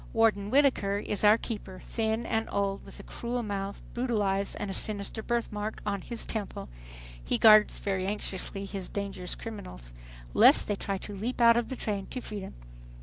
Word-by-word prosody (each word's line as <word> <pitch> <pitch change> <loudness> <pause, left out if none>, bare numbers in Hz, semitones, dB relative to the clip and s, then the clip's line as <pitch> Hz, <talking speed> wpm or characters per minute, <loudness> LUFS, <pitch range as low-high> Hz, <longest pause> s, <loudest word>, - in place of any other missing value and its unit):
Warden 215 -3 +3
Whittaker 255 -7 +3
is 205 0 -2
our 210 +1 +7
keeper, 205 -5 -6
thin 225 0 -2
and 225 0 -1
old, 200 -1 -1
with - - -11
a - - -9
cruel 240 +1 -4
mouth, 200 -1 -4
brutal 240 -3 0
eyes 195 0 0
and 200 - -4
a - - -4
sinister 205 +2 -1
birthmark 220 -2 -2
on 200 -2 -1
his 235 +3 -5
temple. 215 - -5 0.5
He - - 0
guards 215 -1 +7
very 190 -2 -1
anxiously 200 -1 -3
his 195 -2 -5
"dangerous 195 -3 -4
criminals" 185 - -8 0.4
lest - - +7
they 205 - 0
try 195 0 -2
to 205 +2 -7
leap 230 +7 -3
out 235 -1 +7
of 235 -1 0
the 260 - -3
train 205 -5 -3
to 255 - -5
freedom! 210 -5 -7
210 Hz, 180 wpm, -29 LUFS, 195-225 Hz, 0.5 s, our